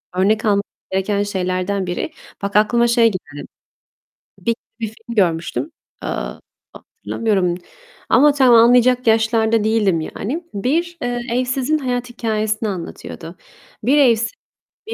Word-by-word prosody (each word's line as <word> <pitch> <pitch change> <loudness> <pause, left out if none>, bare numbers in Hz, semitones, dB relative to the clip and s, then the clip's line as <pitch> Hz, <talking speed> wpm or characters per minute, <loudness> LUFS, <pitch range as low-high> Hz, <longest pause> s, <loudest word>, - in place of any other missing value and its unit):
Örnek 210 +4 +2
almamız 200 -2 +3 0.3
gereken 200 +2 0
şeylerden 185 0 -2
biri. 175 - -3 0.3
Bak 200 0 -4
aklıma 235 +3 +4
şey 235 0 +4
geldi. 145 -7 -8 0.9
Bir 230 0 0 0.2
bir 225 - -2
film 225 +2 -10
görmüştüm, 175 - 0 0.3
eee, - - -3 0.6
hatırlamıyorum 195 -6 -2 0.5
ama 295 +2 +6
tam 260 -4 +5
anlayacak 245 +2 +5
yaşlarda 220 0 +3
değildim 210 -6 +2
yani. 275 - -4
Bir, 330 - -1
eee, 245 0 -2
evsizin 255 +4 0
hayat 250 -3 -2
hikâyesini 215 -2 -1
anlatıyordu. 175 -1 -7 0.5
Bir 265 +6 +3
evsiz, 235 -6 +3 0.6
bir 455 - -4
225 Hz, 120 wpm, -19 LUFS, 200-245 Hz, 0.9 s, ama